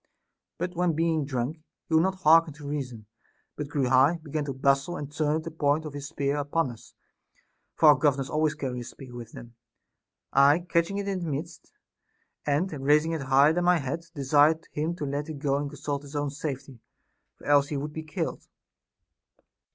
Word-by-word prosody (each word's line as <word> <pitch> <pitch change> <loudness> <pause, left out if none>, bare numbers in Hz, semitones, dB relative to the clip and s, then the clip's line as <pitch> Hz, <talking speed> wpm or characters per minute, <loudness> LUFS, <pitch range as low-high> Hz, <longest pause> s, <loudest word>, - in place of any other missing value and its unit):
But 180 +1 -3
when 175 -1 +1
being 160 -1 +1
drunk 135 +3 -3 0.3
he - - -4
would 160 - +6
not 190 +2 +1
harken 160 0 +6
to 150 -2 -9
reason, 125 -7 -5 0.5
but 150 - -4
grew 140 -2 0
high, 135 +7 +4
began 150 -1 -3
to 140 - -3
bustle, 140 +6 +1
and 145 -1 -6
turned 155 +1 0
the 165 - -6
point 155 0 +1
of 150 - -6
his 145 -1 -6
spear 140 +1 -1
upon 145 -1 0
us 115 - -15 0.8
(for 155 - +6
our - - +10
governors 140 -3 +1
always 155 0 0
carry 130 -4 -4
a - - -5
spear 125 +1 -11
with 120 -2 -9
them), 120 0 -11 0.8
I 140 +4 +5
catching 170 +4 +1
it 200 0 -3
in 195 -2 -1
the 170 -2 -4
midst, 155 +4 -6 0.8
and 150 +6 +1
raising 150 +3 +4
it 160 -2 -2
higher 135 +3 +4
than 175 +1 0
my 180 0 +5
head, 165 +4 -4
de 140 - -4
sired 150 +4 +4
him 160 +3 -2
to 150 - -4
let 145 +2 -3
it 155 - -5
go 140 -1 0
and 145 0 -3
consult 140 0 -4
his 145 +1 -12
own 145 -1 -1
safety, 135 -3 -6 0.6
for - - -17
else 145 -1 +4
he 145 - -3
would 150 +2 -4
be 160 - -4
killed. 155 -1 -4
145 Hz, 195 wpm, -27 LUFS, 140-160 Hz, 0.8 s, our